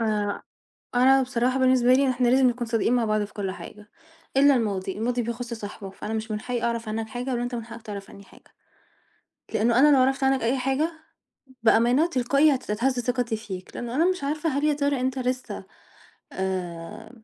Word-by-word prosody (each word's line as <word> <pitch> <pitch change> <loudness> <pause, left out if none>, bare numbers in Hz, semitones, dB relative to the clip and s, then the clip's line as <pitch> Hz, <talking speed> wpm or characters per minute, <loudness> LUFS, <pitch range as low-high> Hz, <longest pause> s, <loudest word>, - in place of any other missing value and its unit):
آآ 210 -2 -1 0.5
أنا 265 +2 +5
بصراحة 255 0 0
بالنسبة 255 -1 +4
لي 265 0 +4
إحنا 250 -1 +1
لازم 260 +1 +5
نكون 240 0 -2
صادقين 230 +1 +1
مع 240 -2 +2
بعض 215 -1 +1
في 205 - -11
كُل 200 -3 -3
حاجة، 205 +2 -11 0.5
إلّا 280 +1 +6
الماضي 200 -5 -2
الماضي 240 +2 0
بيخُص 235 +1 -4
صاحبه، 205 -3 -8
فأنا 210 +3 -6
مش 220 0 -4
من 210 0 -2
حقّي 245 0 -3
أعرف 235 -1 -2
عنَّك 220 +1 -3
حاجة 245 +3 -4
ولا 240 -1 -1
أنت 245 0 -3
من 230 -2 -4
حقَّك 230 0 -10
تعرَف 205 -2 -8
عنّي 200 - -13
حاجة. - - -21 1.0
لأنه 235 +2 +3
أنا 290 +1 +6
لو - - +4
عرَفت 270 +1 +1
عنَّك 265 -2 +2
أي 245 +4 +1
حاجة، 270 +6 0 0.7
بأمانة 240 +7 +4
تلقائي 280 +1 +3
هتتهز 250 +1 -1
ثقتي 245 -1 -1
فيك 190 -4 -8
لأنه 240 0 -5
أنا 320 - +3
مش 365 -6 -3
عارفة 305 +3 -1
هل 285 +1 -1
يا 300 -1 +3
ترى 285 -2 0
أنت 260 +1 -1
لسّه 255 0 -3 0.7
آمم 185 +4 -5
245 Hz, 190 wpm, -25 LUFS, 220-265 Hz, 1.0 s, إلّا